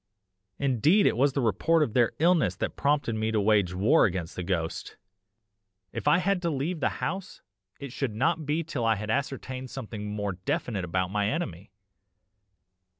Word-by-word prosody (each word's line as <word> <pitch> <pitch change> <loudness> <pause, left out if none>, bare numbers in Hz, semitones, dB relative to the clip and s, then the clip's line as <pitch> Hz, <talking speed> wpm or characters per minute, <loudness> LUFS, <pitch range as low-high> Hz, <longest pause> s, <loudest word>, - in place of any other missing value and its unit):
Indeed 140 - +3
it - - +3
was 135 +3 +2
the 140 - 0
report 155 - +2
of 115 - -3
their 120 -1 +3
illness 160 - +3
that - - -3
prompted 145 -4 +1
me 110 0 -1
to 110 -1 +1
wage 100 -4 +2
war 110 - +4
against 90 -4 -3
the - - -4
ghost 85 -3 -3 0.9
if - - -5
I 150 - +6
had 185 0 +1
to 170 - 0
leave 155 +4 -2
the - - +1 0.2
house, 190 +1 -5 0.4
it 140 -3 -7
should 125 -4 -3
not 135 +7 +1
be 155 +3 0
till 145 -6 -4
I 115 -1 +3
had 105 +1 -4
ascertained 130 -1 -3
something 105 -2 -6
more 105 -1 -2
definite 95 +2 -3
about 90 +1 -1
my 105 0 +1
enemy. 100 - -4
120 Hz, 175 wpm, -27 LUFS, 105-150 Hz, 0.9 s, I